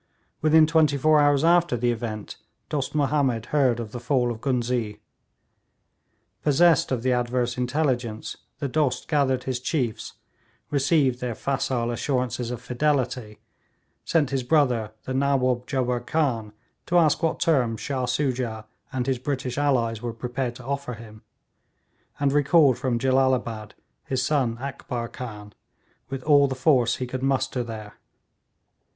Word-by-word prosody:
Within 155 +1 +6
twenty 155 -2 +3
four 155 +2 +4
hours 145 -1 +3
after 170 -5 +3
the 120 +1 +1
event 110 -3 -5 0.3
Dost 145 -1 -3
Mahomed 135 -6 +1
heard 130 -5 +3
of 110 -3 -6
the 120 - -6
fall 125 -1 +1
of 115 -1 -7
Ghuznee. 120 -5 -1 1.4
Possessed 160 +1 +4
of 120 -3 -1
the 130 -1 +2
adverse 120 0 0
intelligence, 125 -4 -1 0.2
the 140 - -2
Dost 140 -1 0
gathered 135 -4 +1
his 130 -2 -2
chiefs, 125 -4 -2 0.6
received 140 -3 +2
their 120 -2 -3
facile 130 -3 -1
assurances 125 -1 -2
of 125 -1 -4
fidelity, 125 -4 -1 0.7
sent 150 -5 +1
his 135 -1 0
brother 125 -6 +1
the 130 - -4
Nawaub 130 -2 +1
Jubbar 125 -3 0
Khan 120 -5 -1 0.4
to 175 - +2
ask 160 -2 +3
what 165 -1 0
terms 130 - +1
Shah 130 -3 -2
Soojah 125 -6 -1 0.3
and 130 -2 -2
his 130 -2 0
British 130 -1 -3
allies 120 -6 +1
were 120 -1 -4
prepared 120 +1 -3
to 125 - -12
offer 140 -2 -3
him, 110 -1 -13 1.0
and 140 -1 +1
recalled 145 -3 +4
from 125 -2 0
Jellalabad 130 -4 0 0.3
his 125 -2 -1
son 130 -6 +1
Akbar 125 -3 -5
Khan, 105 -4 -8 0.6
with 135 -1 -5
all 145 -2 +5
the 135 - -3
force 130 -3 +3
he 130 - -4
could 130 +1 -5
muster 135 -2 0
there. 110 -3 -9
130 Hz, 145 wpm, -25 LUFS, 120-140 Hz, 1.4 s, Within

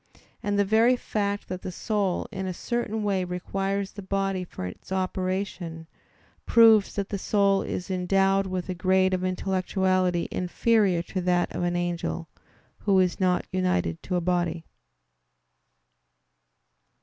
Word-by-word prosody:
And 205 0 -1
the 205 - +3
very 225 +5 +4
fact 205 -4 -2
that 185 0 -5
the 185 - -5
soul 200 -1 -1
in 190 0 -4
a 185 - -4
certain 220 -1 -2
way 195 -2 +1
requires 195 +2 -2
the 205 - -8
body 195 -1 -1
for 175 - -7
its 90 - -9
operation, 185 -3 -2 0.6
proves 225 -3 +6
that 200 -1 -2
the 200 - -3
soul 200 -1 +2
is 180 +2 -4
endowed 195 +1 +2
with 185 -1 -3
a 185 - -2
grade 185 +1 +2
of 185 0 -1
intellectuality 185 -1 0
inferior 185 -1 +2
to 185 +1 -4
that 180 -1 +1
of - - -2
an 175 0 0
angel, 175 -1 -2 0.5
who 200 -2 +2
is 180 -1 +1
not 180 -1 +2
united 180 - 0
to 185 - -3
a 175 - +1
body. 175 -2 -1
185 Hz, 145 wpm, -26 LUFS, 180-200 Hz, 0.6 s, proves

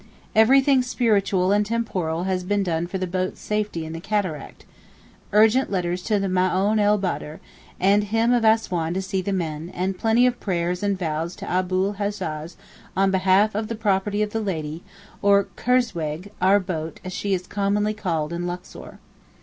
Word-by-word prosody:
(1) - - -24 0.4
Everything 270 +1 +5
spiritual 205 -7 +1
and 205 +1 +3
temporal 195 -7 -2
has 185 -1 -1
been 200 +2 0
done 170 -2 -1
for 190 - -4
the 185 - -2
boat's 185 +1 -3
safety 210 -6 -2
in 160 - -6
the 165 - -5
Cataract—urgent 210 - -1
letters 180 -1 -1
to 210 +3 0
the 195 - -1
Maōhn 185 +3 +1
el 210 0 +4
Baudar, 175 -5 -4 0.4
and 200 +2 +3
him 225 +3 +2
of 240 -2 +2
Assouan 185 -7 +2
to 190 - 0
see 190 0 -2
to - - -13
the - - +1
men, 165 -3 -3
and 185 +1 -2
plenty 225 +2 +3
of 245 -1 +1
prayers 180 -2 -1
and 200 -1 0
vows 165 0 -3
to - - -8
Abu 185 +1 +1
l - - -4
Hajjaj 170 -6 -4 0.4
on 195 0 +3
behalf 190 +3 +3
of 215 +1 -2
the 230 - -4
'property 205 -1 0
of 210 - -3
the 225 - -2
Lady,' 160 -5 -3 0.4
or 200 0 +5
kurzweg 190 -8 -1
'our 195 +2 +5
boat' 165 -4 -5
as 185 - -5
she 200 0 0
is 180 0 -5
commonly 205 +2 0
called 170 -7 -2
in 175 +1 -3
Luxor. 180 +1 -8
190 Hz, 180 wpm, -23 LUFS, 175-210 Hz, 0.4 s, Everything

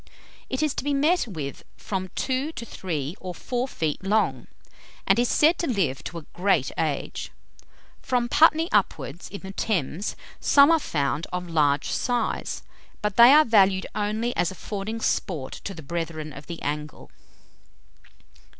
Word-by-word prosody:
It 260 +3 -1
is 305 - +1
to - - -4
be 285 0 0
met 310 +3 +2
with 150 -9 -6
from 185 -2 -4
two 265 +3 -1
to 235 - -7
three 160 -7 -4
or 180 -2 -6
four 250 +6 -2
feet 160 - -3
long, 210 +3 +1 0.6
and - - +4
is 245 - +2
said 315 +3 +4
to 340 - -1
live 165 - 0
to 170 - -5
a 160 - -8
great 180 -7 +1
age. 155 -4 -2 0.7
From 245 -2 0
Putney 320 +4 +5
upwards, 185 -5 0
in 200 - -8
the 190 - -7
Thames, 195 - -1 0.2
some 285 +2 +6
are 325 - +5
found 150 - -1
of 180 0 -3
large 150 -4 +2
size; 245 -1 -1 0.4
but 210 -2 -1
they 240 +2 +9
are 305 +2 +7
valued 195 -4 +4
only 215 +3 -1
as 175 - +1
affording 205 +4 -5
sport 155 -13 -1
to 200 - -4
the 160 - -9
brethren 155 -1 -4
of 140 +2 -11
the 170 -1 -6
angle. 150 +1 -5
195 Hz, 160 wpm, -25 LUFS, 160-245 Hz, 0.7 s, they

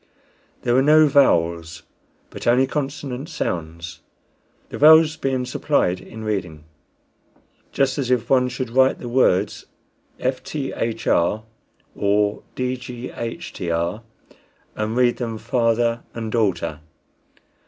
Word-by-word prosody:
There 120 - +1
were 130 - +5
no 155 +3 +6
vowels, 85 - +2 0.5
but - - -7
only 125 +3 +4
consonant 135 0 -4
sounds, 85 0 -4 0.7
the - - -7
vowels 160 +1 +7
being 135 -4 -1
supplied 130 -8 0
in 110 -1 -10
reading, 95 -8 -3 1.1
just 135 +1 0
as 130 -3 -2
if 120 -2 +1
one 125 -1 +3
should 125 -1 -5
write 130 +2 +4
the 120 - -8
words 110 -6 +1 0.5
fthr 135 +2 -3 1.2
or 105 0 +1
dghtr, 120 - -4 0.7
and 110 +2 -2
read 125 -1 +3
them 115 -3 -4
father 115 0 +1
and 115 -1 -4
daughter. 90 -9 0
120 Hz, 105 wpm, -22 LUFS, 100-130 Hz, 1.2 s, vowels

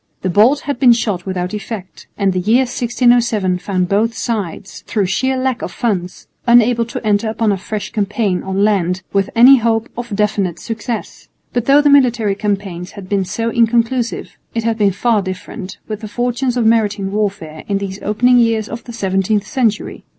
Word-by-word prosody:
The 185 - 0
bolt 235 +10 +4
had 285 -4 -4
been 250 -3 +6
shot 200 -6 -2
without 180 0 -3
effect, 210 -2 -7
and 195 -2 +1
the 185 - 0
year 220 +8 +3
1607 240 -6 +1
found 185 -1 -1
both 220 +4 +1
sides, 200 -4 -4
through 205 -3 0
sheer 260 +8 0
lack 255 -2 -1
of - - -4
funds, 185 -6 -3 0.2
unable 235 0 +4
to 235 - -7
enter 210 +1 +1
upon 220 -1 0
a 195 - 0
fresh 205 +2 -5
campaign 205 -3 -1
on 190 +1 -1
land 185 -3 +1
with 195 0 +1
any 255 +4 +8
hope 225 -1 0
of 235 -3 -5
definite 205 -4 0
success. 225 0 -6 0.3
But 240 -1 -1
though 280 +2 +5
the 290 - +4
military 240 -7 +3
campaigns 195 -3 -3
had 195 -3 -10
been 195 -2 0
so 230 +5 -2
inconclusive, 235 +1 0 0.2
it 230 - -1
had 225 0 -1
been 200 -2 +3
far 220 +2 +1
different 185 +1 -7
with 215 -2 -5
the 215 - -6
fortunes 245 +3 -1
of 235 - +1
maritime 210 -3 +1
warfare 195 -7 -3
in 200 - 0
these 195 0 -5
opening 245 +4 +3
years 225 -2 +1
of 230 +1 -7
the 235 - -9
seventeenth 195 0 0
century. 230 -5 -1
215 Hz, 185 wpm, -17 LUFS, 195-235 Hz, 0.3 s, any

